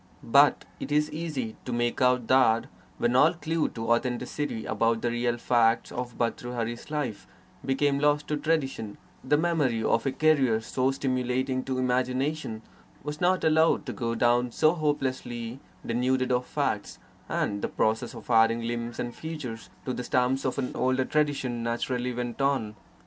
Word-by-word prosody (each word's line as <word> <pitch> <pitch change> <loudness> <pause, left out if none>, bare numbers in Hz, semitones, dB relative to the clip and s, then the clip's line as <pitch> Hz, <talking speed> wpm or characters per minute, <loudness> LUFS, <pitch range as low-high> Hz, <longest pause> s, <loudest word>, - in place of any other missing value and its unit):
But - - +4
it 140 - -6
is 150 +1 +2
easy 150 -8 -4
to 125 - -5
make 120 +1 -1
out 125 -1 +3
that, 120 -3 +4 0.3
when 120 +1 +1
all 155 +6 +6
clue 165 -1 -1
to 115 0 -3
authenticity 125 +1 -1
about 115 +1 0
the 120 - +1
real 120 0 0
facts 115 -1 +2
of 120 -1 -5
Bhartrhari's 120 0 -3
life 125 -11 -3 0.4
became 140 +1 +1
lost 145 0 +2
to 150 - 0
tradition, 135 -9 -1 0.3
the 145 +3 +3
memory 150 -9 +1
of 115 - +1
a - - +1
career 135 -7 +3
so 130 +3 0
stimulating 130 -1 -1
to 130 -1 -2
imagination 130 -1 -1 0.4
was 150 +2 -5
not 185 +1 +2
allowed 160 -1 +3
to 125 - -4
go 115 -2 -2
down 120 +1 +2
so 155 +6 +3
hopelessly 130 -6 -2 0.3
denuded 130 +2 +1
of 125 0 +1
facts, - - -2 0.3
and 100 0 -1
the - - 0
process 110 +2 -1
of - - -8
adding 115 0 +4
limbs 120 0 -3
and 120 -1 -3
features 145 -8 -7 0.2
to 130 - -2
the 125 - -4
stump 125 +2 +1
of 130 - -1
an 130 -2 -2
older 130 0 +1
tradition 140 -6 0
naturally 120 +2 -1
went 120 +1 -4
on. 130 -6 0
125 Hz, 160 wpm, -27 LUFS, 120-140 Hz, 0.4 s, all